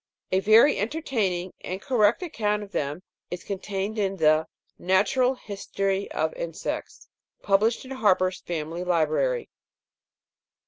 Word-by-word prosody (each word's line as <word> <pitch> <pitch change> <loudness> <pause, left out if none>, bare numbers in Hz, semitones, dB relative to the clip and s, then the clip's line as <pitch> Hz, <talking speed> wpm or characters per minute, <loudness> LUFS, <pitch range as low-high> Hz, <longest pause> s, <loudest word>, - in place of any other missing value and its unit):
A 185 - +3
very 220 +8 +6
entertaining 210 - -1
and 185 +1 -4
correct 235 - +2
account 210 -10 -1
of 200 - -12
them 150 +1 -3 0.3
is 175 0 -6
contained 200 +2 -3
in 195 -1 0
the 155 -1 +3 0.2
" - - -45 0.2
Natural 250 +7 +3
History 195 -3 -3
of 160 0 -1
Insects," 165 -1 -5 0.4
published 215 +6 +2
in 260 - -10
Harper's 185 -7 +2
Family 165 +1 -4
Library. 180 - +1
195 Hz, 125 wpm, -26 LUFS, 180-220 Hz, 0.4 s, very